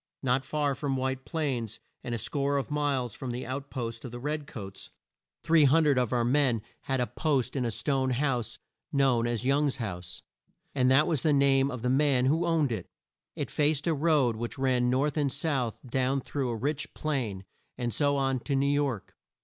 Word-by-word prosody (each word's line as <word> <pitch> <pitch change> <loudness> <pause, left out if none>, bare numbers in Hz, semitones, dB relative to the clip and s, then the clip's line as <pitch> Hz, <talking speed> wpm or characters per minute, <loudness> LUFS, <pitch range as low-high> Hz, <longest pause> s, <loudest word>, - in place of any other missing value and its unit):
Not 130 0 +2
far 145 +1 0
from 135 0 -2
White 130 0 -2
Plains 130 -9 -2 0.2
and 120 - -3
a - - -1
score 140 +3 -1
of 140 - -3
miles 140 -6 0
from 130 - -6
the 125 +1 -4
out 135 +3 -5
posts 115 -3 -5
of 125 - -6
the 120 - -7
red 150 +2 -3
coats 100 -8 -8 0.5
300 155 -3 +4
of 125 -3 0
our 120 -2 +1
men 125 -4 +2 0.2
had 135 -1 0
a 125 - +2
post 140 -4 -1
in 130 -3 0
a - - 0
stone 135 +3 0
house 125 -3 -1 0.3
known 130 -4 +2
as 120 0 -2
Young's 140 +1 +2
house, 90 -6 -6 0.5
as 130 -2 +2
that 135 +4 +5
was 155 -6 0
the 155 - +3
name 140 -1 +4
of 125 -3 -6
the 125 - +1
man 135 -2 +3
who 160 +6 +2
owned 160 -5 +2
it. 105 -6 -4 0.5
It - - -4
faced 150 -1 +1
a 165 - +2
road 145 -6 +2
which 120 +1 -5
ran 130 -2 +2
north 135 +4 +1
and 145 -3 +1
south 140 -6 -1
down 130 +2 0
through 135 -1 -3
a 115 - -2
rich 140 +5 -3
plain, 120 -11 -2 0.3
and 120 -2 -2
so 145 -1 +2
on 135 -1 +1
to 140 +3 -2
New 140 +1 +2
York. 140 -8 -1
135 Hz, 200 wpm, -29 LUFS, 125-145 Hz, 0.5 s, that